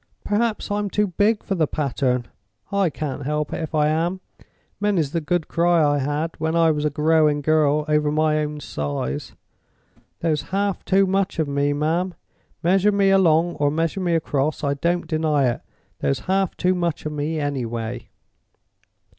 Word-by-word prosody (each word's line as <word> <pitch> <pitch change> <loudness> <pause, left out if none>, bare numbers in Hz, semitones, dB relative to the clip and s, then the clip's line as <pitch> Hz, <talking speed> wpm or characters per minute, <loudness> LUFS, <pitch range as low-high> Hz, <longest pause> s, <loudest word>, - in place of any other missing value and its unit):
Perhaps 215 0 -1
I'm 205 0 -1
too 210 +2 +1
big 205 +4 +1
for - - -2
the 165 -5 +1
pattern? 130 -5 -1 0.4
I 200 -3 +2
can't 145 -2 -5
help 150 +1 -2
it - - -3
if 160 0 -4
I 150 -1 +3
am. 170 +4 0 0.6
Many's 195 -9 +1
the 165 - -1
good 160 +2 -1
cry 170 -1 +3
I 145 0 +2
had, 145 +4 -1
when 160 +1 -1
I 165 -1 +4
was 150 -1 -1
a - - +3
growing 150 0 +2
girl, 150 -1 +2
over 150 -1 +2
my 155 0 +2
own 150 0 -3
size! 70 - -4 0.9
There's 155 -3 +1
half 200 0 -1
too 195 +1 +4
much 195 0 0
of 160 -2 0
me, 140 0 0
ma'am—measure 180 +4 -1
me 200 -1 +3
along 175 -3 +3
or 145 0 +2
measure 165 +5 -1
me 175 -2 +1
across, 150 -2 -1
I 140 -1 +1
don't 170 +5 -1
deny 155 -4 +1
it—there's 70 -10 -5
half 190 0 0
too 180 +1 +2
much 175 -4 -2
of 155 - -2
me, 150 +2 -2
anyway." 120 -5 -3
155 Hz, 165 wpm, -22 LUFS, 145-180 Hz, 0.9 s, I